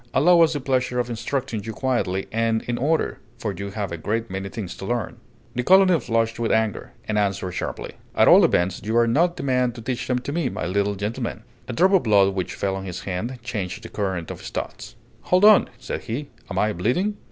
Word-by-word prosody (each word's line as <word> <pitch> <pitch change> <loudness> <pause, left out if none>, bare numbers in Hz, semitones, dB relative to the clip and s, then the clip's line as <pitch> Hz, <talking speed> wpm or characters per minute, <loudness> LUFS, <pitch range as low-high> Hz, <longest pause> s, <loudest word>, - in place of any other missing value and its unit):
Allow 170 +5 +6
us 165 -1 +5
the 145 - -2
pleasure 130 -2 0
of 120 0 -1
instructing 120 -1 -3
you 110 - -5
quietly 110 -7 -1
and 115 0 +1
in 120 0 -3
order, 155 +4 0 0.2
for - - -3
you 100 0 -5
have 100 -2 -4
a 85 - -3
great 110 +5 -2
many 95 +1 -4
things 100 -3 -6
to 95 - -7
learn." 120 +1 -2 0.4
The 125 - -1
colonel 185 +3 +5
flushed 115 -2 0
with 115 - 0
anger, 110 -2 0
and 105 -1 +1
answered 100 -2 -1
sharply: 90 - -4 0.2
"At - - +5
all - - +8
events, 90 +1 +2
you 110 +3 0
are 120 - +5
not 170 +9 +2
the - - -5
man 125 -2 +1
to 115 - -9
teach 125 0 -3
them 125 - +1
to 125 +3 -4
me, 155 -4 0
my - - -4
little 100 +3 0
gentleman!" 110 +2 -4 0.2
A 125 - -4
drop 185 +10 +3
of 190 - +5
blood 100 -3 +4
which 90 -2 -3
fell 95 -1 -1
on 95 0 -5
his 90 -1 -5
hand 105 +7 -4
changed 105 -3 -4
the 110 - -8
current 95 -5 -3
of - - -8
his - - -8
thoughts. - - -6 0.3
"Hold 185 +3 +5
on!" 215 -2 +7
said 130 - -5
he: 130 +5 -5 0.2
"am 95 - -4
I 105 +2 +2
bleeding?" 175 - 0
115 Hz, 230 wpm, -23 LUFS, 100-130 Hz, 0.4 s, all